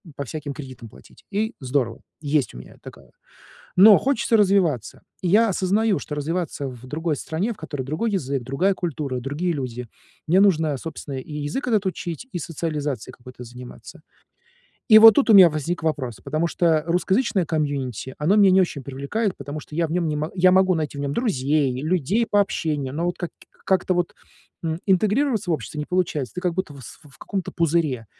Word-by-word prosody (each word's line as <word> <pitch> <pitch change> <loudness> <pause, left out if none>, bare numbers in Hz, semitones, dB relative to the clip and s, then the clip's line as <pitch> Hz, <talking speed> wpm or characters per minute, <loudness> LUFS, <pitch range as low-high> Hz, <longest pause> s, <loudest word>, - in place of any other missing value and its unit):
по 140 - -4
всяким 145 +2 -6
кредитам 130 -6 -9
платить. - - -19
И 220 +3 -1
здорово. 125 -3 -2 0.2
Есть 145 - 0
у - - -8
меня - - -12
такая. - - -13 0.7
Но 200 +2 +9
хочется 260 -4 +1
развиваться. 185 - +1 0.2
И 180 - -2
я 220 +4 +4
осознаю, 195 +2 +1
что 150 - -6
развиваться 150 -1 -3
в 125 -1 -9
другой 155 +3 -2
стране, 175 - -2
в - - -11
которой 145 -4 -5
другой 155 - -2
язык, 140 -8 -2
другая 135 +11 +1
культура, 150 -8 -3
другие 145 +8 -2
люди, 125 -5 -5 0.4
мне 180 +5 +4
нужно, 160 -7 +3
собственно, 145 -2 -7
и 130 - -10
язык 150 - -3
этот 215 -4 +2
учить, 180 +3 -4
и - - -3
социализацией 150 -6 -4
какой-то 125 0 -12
заниматься. 125 +1 -12 0.9
И 220 -3 +9
вот 225 -1 +10
тут 270 -4 +2
у - - +7
меня 185 -3 +9
возник 160 +2 -3
вопрос, 135 -8 -2
потому 160 +2 -1
что 165 -3 +1
русскоязычное 190 +3 +1
комьюнити- 140 -5 -3
оно 175 +8 +2
меня 200 -2 +6
не 190 +1 +5
очень 160 -5 -2
привлекает, 140 - -3
потому 145 +2 -7
что 150 - -11
я 170 -1 +1
в - - -8
нём 170 -1 0
не 150 - -1
мо 155 +2 -3
я 185 0 +5
могу 190 0 +4
найти 150 -2 -3
в - - -4
нём 140 0 -2
друзей, 140 - 0
людей 180 - +1
по 205 - +2
общению, 150 -8 -1
но 165 - -2
вот 175 - -2
как 175 - -5
и - - -32 0.2
как-то 185 -1 +2
вот, 175 -1 -1 0.5
м, 160 0 -2
интегрироваться 210 +3 +1
в - - +3
общество 150 +2 -5
не 150 - -3
получается. 165 -8 -1
Ты 180 - -4
как 180 -2 0
будто 185 -4 -3
в 140 - -12
с - - -12
в 140 -3 -18
каком-то 195 -4 -4
пузыре. 155 -7 0
160 Hz, 195 wpm, -23 LUFS, 140-190 Hz, 0.9 s, вот